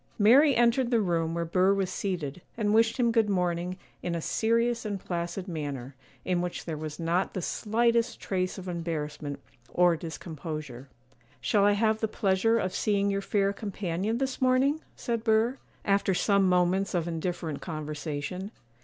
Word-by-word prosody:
Mary 260 +7 +6
entered 240 +1 +3
the 235 -2 +3
room 165 -4 0
where 170 0 -1
Burr 185 +4 +3
was 195 -2 -1
seated, 175 -5 -3 0.2
and 210 -2 +1
wished 225 0 +4
him 240 -2 +3
good 225 -2 +3
morning, 180 -1 0 0.2
in 175 -1 -2
a - - -1
serious 230 +6 +1
and 205 -3 -3
placid 175 +2 -3
manner, 145 -6 -5 0.3
in 180 -1 +1
which 175 0 -4
there 160 - -3
was 155 +1 -6
not 170 +3 0
the - - -1
slightest 235 +4 +1
trace 185 -1 -2
of 190 -1 -8
embarrassment 155 -4 -4 0.3
or 175 -1 +4
discomposure. 155 -5 -7 0.5
'Shall 200 -2 +2
I 205 - +5
have 220 +1 +2
the 220 - 0
pleasure 210 +1 +2
of 185 -4 -1
seeing 200 -1 +1
your 195 0 -1
fair 200 0 +1
companion 200 +1 -2
this 265 0 -2
morning?' 260 +4 +3
said 235 -3 -2
Burr, 225 +3 +2 0.3
after 195 -1 +2
some 200 0 +3
moments 180 +2 +2
of 170 -1 0
indifferent 165 -2 -3
conversation. 155 +3 -4
190 Hz, 165 wpm, -28 LUFS, 170-220 Hz, 0.5 s, Mary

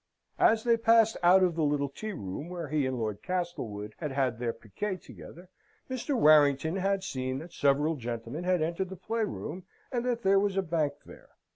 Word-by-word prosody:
As 220 0 +4
they 235 -1 +3
passed 225 -1 +4
out 180 +2 +6
of 180 -2 +2
the 165 - -2
little 145 -1 +1
tea 215 +10 -6
room 100 - -6
where 175 -3 -5
he 150 -2 +1
and 130 -1 -2
Lord 110 -3 -3
Castlewood 125 - -4
had 150 -4 -3
had 130 -4 0
their 120 -1 -1
piquet 185 - -5
together, 180 0 -13 0.4
Mr. 260 +1 -1
Warrington 150 +1 +5
had 195 0 0
seen 130 -6 -3
that 165 +5 -9
several 145 +3 +2
gentlemen 120 +5 -5
had 180 -2 +2
entered 170 +3 -2
the 190 - -7
play 225 +5 -2
room, 180 - -5 0.3
and 240 -3 -1
that 240 -2 -1
there 195 0 +5
was 200 -1 0
a 195 - +2
bank 160 -4 0
there. - - -14
165 Hz, 195 wpm, -29 LUFS, 135-195 Hz, 0.4 s, out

